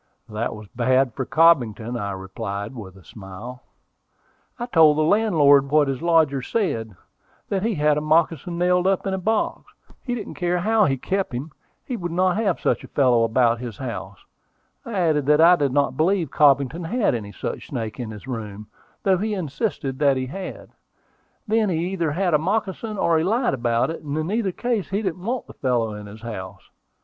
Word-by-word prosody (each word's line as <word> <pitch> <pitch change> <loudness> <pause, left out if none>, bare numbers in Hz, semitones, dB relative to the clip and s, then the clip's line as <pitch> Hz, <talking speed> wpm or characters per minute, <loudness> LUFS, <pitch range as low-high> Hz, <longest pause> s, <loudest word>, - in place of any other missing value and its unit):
"That 110 +1 -3
was 105 -1 -11
bad 130 0 +1
for 130 +1 -4
Cobbington," 125 -8 +3
I 105 -4 -3
replied, 100 +3 -5
with 100 -7 -9
a 95 - -16
smile. 105 +8 -10 1.0
"I 240 - -3
told 160 -9 +5
the 155 - +3
landlord 155 -8 +4
what 150 0 +4
his 135 -2 -3
lodger 160 -5 +3
said, 115 - -2 0.5
that 195 -2 0
he 225 +1 0
had 150 -1 +2
the - - 0
moccasin 165 +2 +1
nailed 180 +1 +2
up 195 0 +1
in 195 - -1
a 190 - -1
box. 220 +4 -1 0.3
He 245 -2 -3
didn't 215 -4 -6
care 175 0 -1
how 215 +4 +3
he 135 -2 +1
kept 195 +3 -2
him: 140 +6 -5 0.3
he 250 - -4
would 175 -3 -4
not 185 +2 +1
have 205 -6 0
such - - 0
a - - -9
fellow 125 -4 +3
about 115 0 +2
his 120 -4 -7
house. 100 -7 -7 0.6
I 235 - -6
added 160 -7 +1
that 150 0 +5
I 170 +2 +7
did 145 -5 0
not 140 -1 +1
believe 170 -2 +1
Cobbington 145 +3 +3
had 225 - +1
any 105 -4 -4
such 90 - -6
snake 110 0 -5
in 120 -3 -4
his 105 0 -9
room, 105 -4 -6 0.3
though 190 -2 +3
he 215 +1 -1
insisted 150 - -3
that 140 -2 +3
he 130 - -2
had. 185 +8 -8 0.8
Then 215 -1 +2
he 170 0 -1
either 170 -6 -1
had 180 0 0
a 150 - +5
moccasin, 210 +4 -2
or 165 -3 +2
he - - 0
lied 225 - +1
about 120 +2 0
it, 165 - -7
and 145 0 -4
in 155 +4 -2
either 215 -3 0
case 235 0 -2
he 200 +3 -1
didn't 180 -2 -3
want 245 +4 -2
the - - -13
fellow 120 -5 0
in 105 0 -8
his 110 +2 -12
house. 95 -4 -8
150 Hz, 200 wpm, -23 LUFS, 120-185 Hz, 1.0 s, I